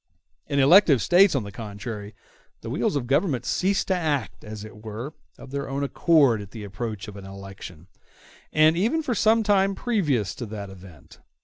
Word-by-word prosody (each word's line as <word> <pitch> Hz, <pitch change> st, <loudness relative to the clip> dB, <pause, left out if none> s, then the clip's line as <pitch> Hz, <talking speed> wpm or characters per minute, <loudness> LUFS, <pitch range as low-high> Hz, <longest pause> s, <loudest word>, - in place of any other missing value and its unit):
In 140 Hz, -, -2 dB
elective 145 Hz, -, +6 dB
States, 180 Hz, -, +5 dB
on 130 Hz, -, 0 dB
the 100 Hz, -, -8 dB
contrary, 105 Hz, 0 st, -7 dB, 0.5 s
the -, -, -6 dB
wheels -, -, 0 dB
of 135 Hz, -4 st, -1 dB
government 135 Hz, -, 0 dB
cease 195 Hz, +7 st, +1 dB
to 190 Hz, -, +1 dB
act, 150 Hz, -, -2 dB
as 105 Hz, -1 st, -8 dB
it 110 Hz, 0 st, -12 dB
were, 115 Hz, +7 st, -6 dB, 0.2 s
of 135 Hz, -, -12 dB
their 140 Hz, 0 st, -4 dB
own 140 Hz, +1 st, -2 dB
accord 140 Hz, -6 st, +3 dB
at 100 Hz, -, -10 dB
the 105 Hz, +1 st, -9 dB
approach 105 Hz, +1 st, -5 dB
of 105 Hz, -, -9 dB
an 100 Hz, -, -10 dB
election, 95 Hz, -4 st, -10 dB, 0.7 s
and 155 Hz, +1 st, +4 dB
even 235 Hz, -, +1 dB
for 255 Hz, -, -1 dB
some 225 Hz, +1 st, +3 dB
time 195 Hz, -2 st, +2 dB
previous 150 Hz, -, 0 dB
to 120 Hz, -, -7 dB
that 100 Hz, -2 st, -7 dB
event. 90 Hz, -6 st, -15 dB
130 Hz, 185 wpm, -25 LUFS, 105-170 Hz, 0.7 s, elective